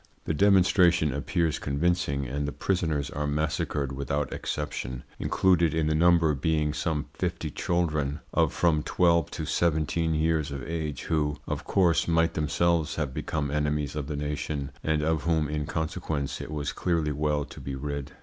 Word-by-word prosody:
The - - 0
demonstration 90 -4 +4
appears 80 +3 0
convincing, 70 -1 0
and 70 +3 -2
the - - -2
prisoners 80 -5 -1
are 75 0 -2
massacred 75 -2 -1
without 70 +2 -2
exception, 65 -4 -4 0.2
included 85 -4 +3
in 80 -1 +1
the 80 - +2
number 85 -1 +4
being 75 +1 0
some 75 -1 -1
fifty 85 -2 -3
children 75 -5 0
of - - +3
from 80 -3 +2
twelve 85 0 +2
to - - -4
seventeen 80 0 +1
years 80 -1 +1
of 70 -3 -5
age, 80 -4 -3
who, 75 -2 0
of - - -3
course, 90 -4 +3
might 80 0 +2
themselves 80 +2 +1
have 75 -4 -2
become 75 0 -2
enemies 75 0 -1
of 75 -2 -3
the 75 -1 -3
nation, 75 -1 -3
and 80 -1 +1
of 80 0 +1
whom 80 -3 +2
in 75 -1 -3
consequence 80 -3 -3
it - - -6
was 75 -2 -3
clearly 85 -4 0
well 75 0 0
to 85 0 -11
be 70 +1 -4
rid. 70 0 -5
75 Hz, 165 wpm, -27 LUFS, 75-85 Hz, 0.2 s, demonstration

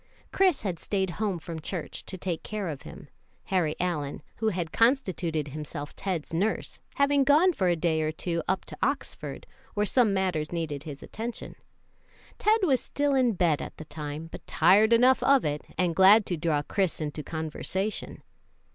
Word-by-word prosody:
Chris 375 -6 +3
had 185 -5 -3
staid 190 -3 -1
home 200 -4 0
from 165 0 -7
church 165 +1 -5
to 185 - -6
take 175 -2 -3
care 210 -4 -4
of 145 -4 -6
him, - - -11 0.4
Harry 175 -5 0
Allyn, 150 -6 -2
who 220 - -1
had 175 -6 -1
constituted 185 - +1
himself 145 0 -6
Ted's 180 -6 -3
nurse, 200 +7 -1 0.2
having 280 0 +3
gone 310 +7 +5
for 190 - 0
a 175 - +3
day 160 -1 +1
or 155 0 0
two 170 +1 -2
up 190 0 0
to - - -9
Oxford, 280 +1 -2 0.3
where 210 0 +2
some 230 +1 +3
matters 185 -6 0
needed 155 -4 -3
his 145 -3 -8
attention. 230 +2 -6 0.9
Ted 435 +1 +3
was 270 -8 +3
still 285 0 0
in 255 -3 +3
bed 170 -5 +2
at - - -7
the 155 - -8
time, 150 +1 -6
but - - -10
tired 200 +7 +5
enough 250 +3 +5
of 275 -1 +4
it, 150 0 -1 0.2
and 175 -2 +1
glad 195 +3 +7
to 175 - -1
draw 155 -2 0
Chris 190 +2 -1
into 150 -1 -4
conversation. 165 +7 -3
180 Hz, 175 wpm, -27 LUFS, 160-220 Hz, 0.9 s, glad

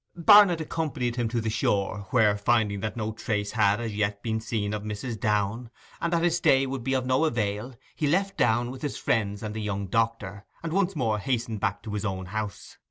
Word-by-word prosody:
Barnet 195 -1 +7
accompanied 150 -7 -2
him 120 -1 0
to 120 0 -1
the 110 -1 -2
shore, 100 -2 -1
where, 110 -5 +4
finding 105 -1 +1
that 110 +3 -4
no 110 -1 -2
trace 105 -2 -2
had 105 -1 +2
as 115 -2 -4
yet 100 -1 -1
been 110 -1 -1
seen 105 -2 -2
of 105 - -3
Mrs. 105 +2 -5
Downe, 105 +3 0 0.3
and 170 - 0
that 170 -1 +1
his 175 -1 +2
stay 135 -5 +4
would 135 -2 -4
be 135 +2 0
of 130 -1 0
no 130 +4 +2
avail, 115 -2 -2 0.2
he 150 - 0
left 195 +6 +1
Downe 120 +2 +2
with 130 0 -9
his 145 - -3
friends 105 -2 -1
and 105 -1 -4
the 110 - -4
young 100 -1 -2
doctor, 110 -1 -1 0.2
and 165 -1 -3
once 195 -1 +1
more 110 -7 0
hastened 115 -1 -2
back 100 -1 -2
to 105 - -6
his 105 - -2
own 95 -3 -3
house. 105 +1 -6
110 Hz, 220 wpm, -27 LUFS, 105-130 Hz, 0.3 s, Barnet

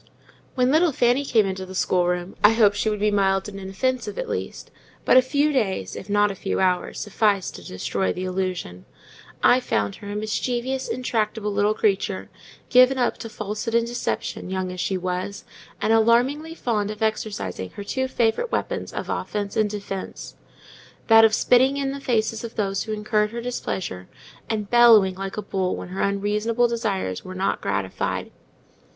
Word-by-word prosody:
When 255 0 +3
little 325 +2 +4
Fanny 245 +1 +2
came 225 -6 +3
into 190 -1 -3
the 190 0 -9
schoolroom, 180 0 0
I 210 +2 +7
hoped 210 -3 +4
she 210 +1 0
would 210 -1 -2
be 210 +1 +2
mild 195 -1 +2
and 195 -1 -8
inoffensive, 255 - -2
at - - -3
least; - - -5 0.3
but - - +5
a 255 - +9
few 285 +4 +1
days, 190 - -1
if 195 - -8
not 205 0 +3
a - - -4
few 195 - -2
hours, 185 -1 0
sufficed 205 -2 0
to 90 - -12
destroy 95 +1 -2
the 185 - -4
illusion: 185 - -3 0.6
I 250 - +6
found 105 - -1
her 205 - -9
a - - -4
mischievous, 245 +5 -2
intractable 220 -4 -1
little 205 +1 +2
creature, 195 -2 0 0.4
given 255 +1 +6
up 245 - 0
to 225 - -6
falsehood 215 +2 -4
and 235 0 +3
deception, 240 -5 -3
young 185 -1 -2
as 180 - -7
she 190 +1 0
was, 185 +2 -4 0.3
and 220 - +2
alarmingly 250 +8 +2
fond 215 -8 -1
of 215 +1 -4
exercising 200 - -2
her 205 - -6
two 260 +6 -2
favourite 255 - 0
weapons - - -2
of - - -5
offence 205 -1 -3
and 215 -1 +2
defence: 200 -2 -6 0.7
that 225 0 +8
of 220 -1 +5
spitting 260 +3 +4
in 275 -1 -1
the 280 0 -6
faces 225 -3 0
of 230 0 -7
those 195 -2 -1
who 220 - -5
incurred 210 0 0
her 235 +2 -6
displeasure, 190 - -4 0.4
and 210 -2 -3
bellowing 230 -5 +7
like 195 +2 -6
a 210 - -3
bull 185 -1 -1
when - - -7
her 185 - -4
unreasonable 210 +4 +1
desires 205 - -2
were 185 0 -8
not 190 +1 -1
gratified. - - -2
210 Hz, 180 wpm, -23 LUFS, 190-240 Hz, 0.7 s, a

